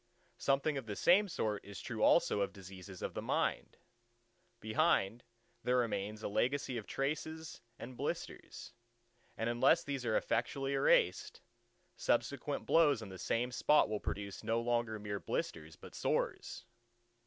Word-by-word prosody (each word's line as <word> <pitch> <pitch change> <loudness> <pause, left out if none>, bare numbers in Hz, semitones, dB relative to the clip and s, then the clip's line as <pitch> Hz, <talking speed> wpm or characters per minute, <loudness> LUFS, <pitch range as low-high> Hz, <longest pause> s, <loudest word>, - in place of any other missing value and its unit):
Something 140 +1 +1
of 125 - -11
the 105 - -4
same 195 - +5
sort 110 - -2
is 100 -1 -9
true - - -5
also - - +4
of 100 - 0
diseases 95 -1 -10
of - - -3
the - - -4
mind. - - -1 0.8
Behind, 115 - +1 0.4
there 125 0 +2
remains 110 -3 -1
a - - -1
legacy 130 +5 0
of 105 - -11
traces 160 +3 -3 0.2
and 125 +1 -8
blisters: - - -5 0.6
and 115 - -1
unless 120 +3 +4
these 140 -3 -3
are 110 -3 +2
effectually 135 -1 -1
erased, 480 - +2 0.6
subsequent - - 0
blows 145 -8 +4
on 105 - -8
the 95 -1 -9
same 120 +7 0
spot 150 +2 +4
will 105 -1 -1
produce 100 -1 -5
no 115 +1 +1
longer 120 -2 0
mere 100 -1 -4
blisters, 80 -4 -4
but - - -13
sores. - - -2
120 Hz, 145 wpm, -35 LUFS, 105-140 Hz, 0.8 s, same